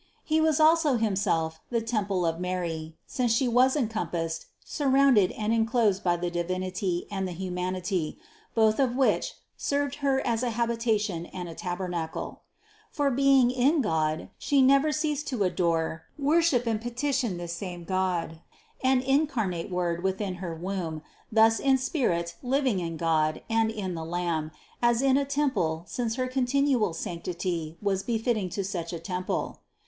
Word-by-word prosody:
He 315 Hz, 0 st, +2 dB
was 315 Hz, -1 st, +3 dB
also 310 Hz, -3 st, +5 dB
Himself 190 Hz, -7 st, 0 dB
the 235 Hz, -, +1 dB
temple 205 Hz, -5 st, -1 dB
of 165 Hz, 0 st, -1 dB
Mary, 170 Hz, -3 st, -3 dB
since 250 Hz, -4 st, 0 dB
She 240 Hz, +3 st, +2 dB
was 250 Hz, +3 st, +4 dB
encompassed, 195 Hz, -, -2 dB, 0.2 s
sur 290 Hz, -3 st, -2 dB
rounded 265 Hz, -8 st, +5 dB
and 215 Hz, +1 st, -1 dB
enclosed 225 Hz, -3 st, +2 dB
by 175 Hz, -1 st, +2 dB
the 175 Hz, 0 st, -2 dB
Divinity 180 Hz, +1 st, -2 dB
and 190 Hz, -2 st, -2 dB
the 180 Hz, -, -5 dB
humanity, 180 Hz, -1 st, -2 dB, 0.4 s
both 220 Hz, 0 st, +3 dB
of 255 Hz, -3 st, +2 dB
which 265 Hz, 0 st, +1 dB, 0.2 s
served 285 Hz, -1 st, -1 dB
Her 275 Hz, -2 st, +1 dB
as 230 Hz, -1 st, 0 dB
a 250 Hz, -, 0 dB
habitation 225 Hz, -6 st, 0 dB
and 180 Hz, -1 st, -6 dB
a 165 Hz, -, -7 dB
taber 180 Hz, +2 st, -4 dB
nacle. 165 Hz, -2 st, -4 dB, 0.5 s
For 285 Hz, -1 st, 0 dB
being 270 Hz, -1 st, +4 dB
in 270 Hz, +5 st, +3 dB
God, 160 Hz, -4 st, 0 dB
she 280 Hz, -2 st, +3 dB
never 275 Hz, +3 st, +5 dB
ceased 300 Hz, 0 st, -1 dB
to 245 Hz, -7 st, 0 dB
adore, 165 Hz, -3 st, 0 dB
wor 300 Hz, +4 st, +3 dB
ship 260 Hz, -8 st, +2 dB
and 225 Hz, -2 st, 0 dB
petition 240 Hz, -3 st, -1 dB
this 175 Hz, -1 st, -5 dB
same 175 Hz, -1 st, -6 dB
God 180 Hz, -3 st, -1 dB, 0.4 s
and 260 Hz, -1 st, +3 dB
incarnate 255 Hz, -, 0 dB
Word 175 Hz, -2 st, -1 dB
within 190 Hz, -1 st, -1 dB
her 170 Hz, -3 st, -4 dB
womb 170 Hz, -3 st, -4 dB, 0.3 s
thus 225 Hz, 0 st, +5 dB
in 270 Hz, -1 st, +3 dB
spirit 175 Hz, -, -1 dB
living 260 Hz, -5 st, +1 dB
in 165 Hz, -2 st, -4 dB
God 155 Hz, -1 st, +1 dB
and 225 Hz, 0 st, +3 dB
in 205 Hz, -5 st, -3 dB
the 165 Hz, -1 st, -4 dB
Lamb 165 Hz, -2 st, -2 dB, 0.3 s
as 240 Hz, +1 st, +3 dB
in 270 Hz, -1 st, +4 dB
a 280 Hz, 0 st, +2 dB
temple 265 Hz, -, 0 dB
since 230 Hz, +1 st, -2 dB
her 255 Hz, 0 st, -1 dB
continual 255 Hz, -, +1 dB
sanctity 170 Hz, -1 st, -4 dB
was 195 Hz, -2 st, +1 dB
be 230 Hz, +2 st, -1 dB
fitting 220 Hz, -4 st, 0 dB
to 195 Hz, +3 st, -3 dB
such 175 Hz, -3 st, -4 dB
a 170 Hz, -, -4 dB
temple. 180 Hz, +2 st, -3 dB
205 Hz, 165 wpm, -27 LUFS, 175-255 Hz, 0.5 s, also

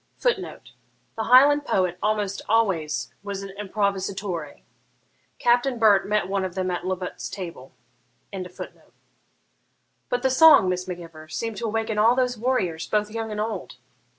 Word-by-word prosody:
[Footnote: -, -, -2 dB, 0.4 s
The 220 Hz, -, -3 dB
Highland 285 Hz, +4 st, +6 dB
poet 180 Hz, -8 st, 0 dB
almost 210 Hz, -2 st, -1 dB
always 190 Hz, -9 st, +1 dB
was 200 Hz, -1 st, -5 dB
an 195 Hz, -, -7 dB
improvisatore. 195 Hz, -5 st, -3 dB, 0.7 s
Captain 245 Hz, +1 st, +2 dB
Burt 210 Hz, -3 st, +4 dB
met 210 Hz, -4 st, +1 dB
one 195 Hz, 0 st, -1 dB
of 185 Hz, -2 st, -4 dB
them 185 Hz, -1 st, -1 dB
at 175 Hz, 0 st, -3 dB
Lovat's 185 Hz, -1 st, -4 dB
table.] 170 Hz, -9 st, -8 dB, 0.6 s
'But 195 Hz, +5 st, -10 dB
the 265 Hz, -, +3 dB
song, 285 Hz, -, +7 dB
Miss 180 Hz, 0 st, -2 dB
Mac 180 Hz, -1 st, -4 dB
Ivor, 165 Hz, -2 st, -12 dB
seemed 225 Hz, +6 st, -4 dB
to 230 Hz, -, -2 dB
awaken 220 Hz, 0 st, -1 dB
all 230 Hz, +3 st, +5 dB
those 250 Hz, -1 st, +1 dB
warriors, 215 Hz, -9 st, -1 dB
both 210 Hz, 0 st, 0 dB
young 225 Hz, 0 st, -4 dB
and 210 Hz, -, -4 dB
old.' 220 Hz, +1 st, -4 dB
205 Hz, 145 wpm, -24 LUFS, 185-230 Hz, 0.7 s, song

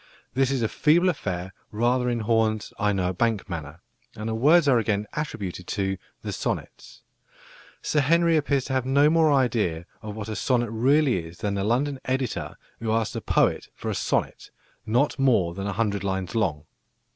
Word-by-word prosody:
This 135 Hz, 0 st, +2 dB
is 135 Hz, -3 st, 0 dB
a -, -, +2 dB
feeble 170 Hz, +9 st, +3 dB
affair 95 Hz, -, -3 dB, 0.2 s
rather 125 Hz, +3 st, +1 dB
in 120 Hz, -1 st, -1 dB
Horn's 110 Hz, -1 st, 0 dB
"I 105 Hz, 0 st, +2 dB
know 95 Hz, -2 st, 0 dB
a -, -, -2 dB
bank" 110 Hz, +1 st, 0 dB
manner, 80 Hz, -1 st, -7 dB, 0.3 s
and 110 Hz, +1 st, -5 dB
the -, -, -1 dB
words 150 Hz, +8 st, +4 dB
are 125 Hz, -4 st, +5 dB
again 105 Hz, -2 st, 0 dB
attributed 100 Hz, -, -5 dB
to 95 Hz, -2 st, -2 dB, 0.2 s
"The -, -, -4 dB
Sonnets." -, -, -5 dB, 0.8 s
Sir 150 Hz, -, +1 dB
Henry 165 Hz, +4 st, +3 dB
appears 140 Hz, -3 st, +1 dB
to 130 Hz, -, -3 dB
have 130 Hz, -1 st, +1 dB
no 140 Hz, +4 st, +4 dB
more 160 Hz, -2 st, +4 dB
idea 115 Hz, -, +1 dB, 0.2 s
of 105 Hz, -2 st, -7 dB
what 110 Hz, -1 st, -6 dB
a 110 Hz, -, -4 dB
sonnet 120 Hz, -2 st, 0 dB
really 130 Hz, -, +2 dB
is 80 Hz, +1 st, -11 dB
than 100 Hz, +4 st, -2 dB
the 100 Hz, -1 st, -1 dB
London 130 Hz, +6 st, 0 dB
editor 130 Hz, -2 st, -2 dB, 0.2 s
who 115 Hz, -1 st, -2 dB
asked 110 Hz, -1 st, 0 dB
a -, -, -3 dB
poet -, -, +1 dB
for -, -, -4 dB
a -, -, -1 dB
sonnet -, -, -2 dB, 0.4 s
"not 125 Hz, +7 st, +1 dB
more 115 Hz, -11 st, +3 dB
than 100 Hz, +2 st, -4 dB
a 100 Hz, -, -2 dB
hundred 100 Hz, -1 st, -1 dB
lines 95 Hz, -1 st, -2 dB
long." 90 Hz, -10 st, -1 dB
115 Hz, 190 wpm, -25 LUFS, 100-135 Hz, 0.8 s, are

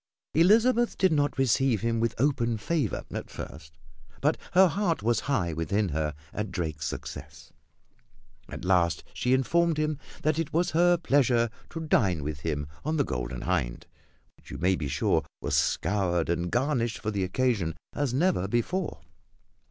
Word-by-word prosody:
Elizabeth 230 Hz, +8 st, +4 dB
did 190 Hz, -2 st, +3 dB
not 145 Hz, -2 st, +1 dB
receive 135 Hz, -3 st, +2 dB
him 115 Hz, 0 st, 0 dB
with 115 Hz, -1 st, 0 dB
open 120 Hz, -3 st, +1 dB
favor 135 Hz, +2 st, -1 dB
at -, -, -5 dB
first; 75 Hz, +2 st, -9 dB, 0.4 s
but -, -, +2 dB, 0.2 s
her 190 Hz, +1 st, +7 dB
heart 175 Hz, -, -1 dB
was 120 Hz, +1 st, +2 dB
high 90 Hz, -, +1 dB
within 95 Hz, +6 st, 0 dB
her 75 Hz, -1 st, -2 dB, 0.2 s
at 105 Hz, -1 st, -3 dB
Drake's 80 Hz, -4 st, -3 dB
success. -, -, -8 dB, 1.0 s
At -, -, -7 dB
last 90 Hz, -3 st, +2 dB
she 125 Hz, -, -1 dB
informed 165 Hz, +5 st, +2 dB
him 155 Hz, -1 st, -1 dB, 0.2 s
that 155 Hz, +1 st, +1 dB
it 165 Hz, -, -2 dB
was 175 Hz, +3 st, +1 dB
her 175 Hz, +2 st, +4 dB
pleasure 125 Hz, -7 st, +2 dB, 0.2 s
to 165 Hz, -, -6 dB
dine 95 Hz, -, +2 dB
with 75 Hz, 0 st, -4 dB
him 75 Hz, -2 st, -2 dB, 0.2 s
on 155 Hz, +2 st, -1 dB
the 145 Hz, -, +3 dB
Golden 60 Hz, 0 st, -4 dB
Hind, -, -, -1 dB, 0.5 s
which -, -, -19 dB
you -, -, -6 dB
may 95 Hz, +2 st, +2 dB
be 75 Hz, -5 st, -3 dB
sure 65 Hz, -, +1 dB, 0.2 s
was -, -, -1 dB
scoured 90 Hz, -5 st, +1 dB
and 85 Hz, +1 st, 0 dB
garnished 120 Hz, -2 st, 0 dB
for 110 Hz, -, -3 dB
the 100 Hz, -2 st, -1 dB
occasion 95 Hz, -4 st, 0 dB, 0.2 s
as 145 Hz, -4 st, -1 dB
never 140 Hz, -, +1 dB
before. 135 Hz, -, -1 dB
115 Hz, 160 wpm, -28 LUFS, -, 1.0 s, her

